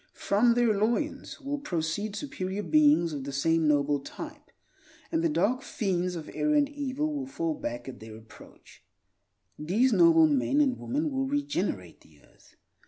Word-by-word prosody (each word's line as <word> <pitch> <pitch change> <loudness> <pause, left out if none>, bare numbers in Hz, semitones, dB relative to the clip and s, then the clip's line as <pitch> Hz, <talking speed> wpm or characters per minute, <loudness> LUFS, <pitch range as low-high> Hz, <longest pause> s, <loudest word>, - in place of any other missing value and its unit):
From 230 +4 +2
their 240 -2 +3
loins 235 +13 -1
will 285 0 -4
proceed 195 - -3
superior 205 -5 -4
beings 295 - +4
of 140 -2 -5
the 140 - -5
same 160 +3 +1
noble 145 -1 +2
type; 300 - -10 0.6
and 325 0 0
the 335 - +2
dark 255 -4 +1
fiends 180 -3 -2
of 160 -2 -7
error 300 0 +1
and 290 -1 +4
evil 290 +1 -3
will 280 -2 -4
fall 165 -11 -2
back 120 -3 -6
at 130 - -8
their 110 0 -10
approach. 110 0 -17 0.8
These 215 +12 +2
noble 330 -1 +6
men 290 -1 +1
and 270 -4 +2
women 295 +4 -2
will 270 0 -1
regenerate 240 - -2
the 75 -2 -22
earth. - - -24
235 Hz, 165 wpm, -28 LUFS, -, 0.8 s, noble